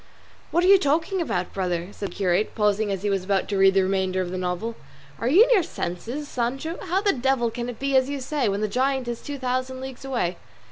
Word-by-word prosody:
"What 345 - +2
are - - +4
you 395 0 +8
talking 325 +5 +1
about, 180 - -2
brother?" 180 -2 -2
said 200 -1 -5
the - - -13
curate, 190 +1 +1
pausing 210 -1 +1
as 195 -1 -3
he 205 - +1
was 195 -2 0
about 195 0 0
to 205 - -1
read 195 0 +5
the 195 - +4
remainder 190 -1 0
of 180 -1 -2
the 185 - -3
novel. 185 +6 -2 0.5
"Are 230 - -1
you 345 - +7
in - - +1
your 430 -6 +6
senses, 240 - -5
Sancho? 270 +7 -3
How 375 +1 0
the 405 - +3
devil 255 -2 +1
can 240 +1 -4
it 240 - -6
be 275 +1 -1
as 260 0 +4
you 285 -1 -3
say, 265 -3 -1
when 200 +1 -1
the 215 - +1
giant 260 +3 0
is 235 -1 -4
two 290 -1 -6
thousand 255 0 -2
leagues 265 -1 -8
away?" 235 -10 -1
240 Hz, 245 wpm, -24 LUFS, 195-275 Hz, 0.5 s, you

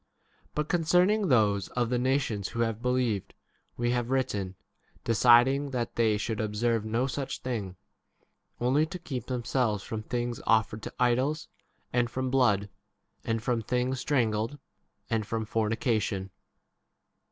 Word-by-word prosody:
But 150 0 -1
concern 180 +3 +3
ing 215 -2 +1
[those 105 - +3
of] 120 -2 -1
the 125 - +2
nations 130 -6 0
who 115 - -3
have 115 -1 -1
believed, 125 -5 0 0.4
we 120 0 +1
have 120 -1 -1
written, 105 -8 -1 0.5
deciding 120 +5 +5
that 120 -3 -3
they 110 -2 +3
should 110 +1 -2
observe 110 +1 0
no 115 +4 0
such 135 0 -4
thing, 105 -8 -3 0.8
only 135 +6 +2
to 180 - -6
keep 130 -9 -6
them 125 -2 -2
selves 110 -6 0
from 110 -1 -4
things 120 +1 -3
offered 110 -1 +2
to - - -7
idols, 130 +6 +1 0.4
and 120 -1 +2
from 130 +1 -2
blood, 105 -7 +3 0.6
and 115 -1 -1
from 120 -2 0
things 125 +3 -1
strangled, 115 -2 0 0.5
and 110 -2 -1
from 115 0 -2
fornication. 110 -3 -1
120 Hz, 140 wpm, -28 LUFS, 110-130 Hz, 0.8 s, deciding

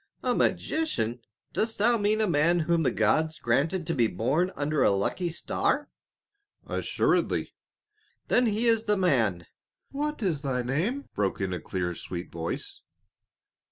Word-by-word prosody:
"A - - +2
magician? 125 - 0 0.3
Dost 225 0 -1
thou 235 +4 +4
mean 215 0 +1
a 215 - +2
man 170 +1 +3
whom 170 +1 +2
the 150 - +3
gods 155 +9 +1
granted 150 +9 0
to 165 - -1
be 120 -6 +3
born 135 - 0
under 150 0 0
a - - +5
lucky 100 - 0
star?" 170 - -1 0.7
"Assuredly!" - - 0 0.7
"Then 245 0 +3
he 220 +2 0
is 225 -1 +3
the 210 -1 +2
man." 115 - +2 0.5
"What 295 -2 -3
is 165 -7 0
thy 130 -3 -1
name?" 180 - -1
broke 100 -2 -1
in 95 -2 -1
a 90 - -3
clear 90 +2 -3
sweet 85 +1 -7
voice. 85 0 -5
155 Hz, 150 wpm, -27 LUFS, -, 0.7 s, a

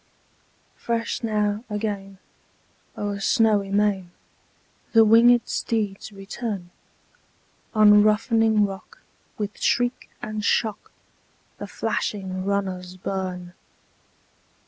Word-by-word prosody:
Fresh 230 0 -2
now, 210 -1 -1
again, 205 -2 -4 0.8
o'er 205 -1 -3
snowy 205 -1 +2
main, 200 -3 +1 0.8
The 225 -1 +7
winged 235 +2 +5
steeds 215 -2 -2
return: 195 -2 -6 1.0
On 210 -1 +7
roughening 215 0 +3
rock, 195 -1 -9 0.3
with 210 -1 -5
shriek 245 +1 0
and 215 -2 -5
shock, 215 0 0 0.7
The - - -6
flashing 190 -2 -3
runners 185 -2 -3
burn. 180 -2 -4
210 Hz, 85 wpm, -24 LUFS, 195-220 Hz, 1.0 s, The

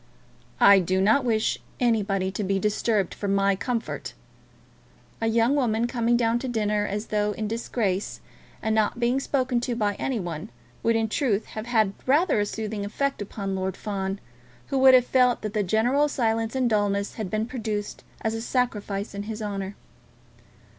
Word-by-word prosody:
"I 200 -1 +8
do 185 +1 0
not 220 +8 +4
wish 220 -3 +1 0.2
anybody 200 -5 +1
to 200 +2 -3
be 195 0 0
disturbed 210 -1 0
for 205 - -5
my 200 0 +2
comfort." 235 +3 -4 1.1
A 225 - +1
young 230 +3 +3
woman 235 -5 +1
coming 240 -1 +1
down 230 0 +2
to 260 - -4
dinner 210 -3 0
as 210 +2 -3
though 210 0 +1
in 215 +1 -3
disgrace, 215 -3 -2 0.4
and 220 - +1
not 220 +2 +1
being 245 +2 +2
spoken 255 -3 0
to 240 0 -2
by 210 -3 0
any 260 -4 -1
one, 175 +1 -5 0.3
would, 230 0 +2
in 225 0 +1
truth, 220 -2 0
have 220 +1 -5
had 220 -5 +2
rather 295 - +3
a 205 - +1
soothing 215 -1 -4
effect 275 +5 -2
upon 200 -1 -4
Lord 190 0 -2
Fawn, 195 -1 -3 0.5
who 275 - +1
would 260 0 +8
have 250 -1 +5
felt 250 -2 +3
that 215 -1 -3
the 215 - +1
general 235 +9 +2
silence 225 -4 0
and 260 -2 +2
dulness 205 -2 0
had 215 -5 -5
been 215 +2 -1
produced 220 -4 -4 0.2
as 220 - -1
a 225 - -3
sacrifice 215 -5 -2
in 200 - -4
his 220 0 -4
honour. 200 -2 -4
220 Hz, 175 wpm, -25 LUFS, 200-240 Hz, 1.1 s, I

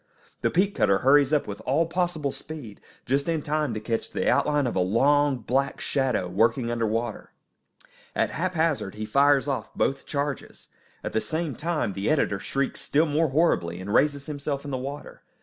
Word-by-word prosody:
The - - +2
peat 195 +3 +2
cutter 100 -1 +3
hurries 140 +1 +5
up 150 -2 +2
with 100 -1 -6
all 150 +6 +1
possible 165 -4 -1
speed, 145 -11 -9 0.2
just 140 +4 0
in 160 -3 0
time 150 -2 0
to - - -2
catch 115 +1 -3
the - - -2
outline 145 -2 +2
of 120 - -2
a - - +2
long, 135 +9 +3
black 130 +4 -1
shadow, 130 -9 0
working 115 +6 +1
under 115 -1 0
water. 115 +1 -3 0.8
At - - +1
haphazard 165 - -1
he 110 0 -4
fires 140 +4 +3
off 130 -6 -3
both 135 - -1
charges. 145 -1 -4 0.3
At - - -4
the 110 - +1
same 155 +7 -2
time 160 - -1
the 100 +2 -2
editor 135 -10 +1
shrieks 135 +6 -2
still 155 +3 +2
more 155 +1 +1
horribly, 110 - +1
and 100 +3 -5
raises 140 +1 +2
himself 145 -1 -4
in 145 - -5
the 130 - -1
water. 140 +3 -7
140 Hz, 185 wpm, -26 LUFS, 115-150 Hz, 0.8 s, hurries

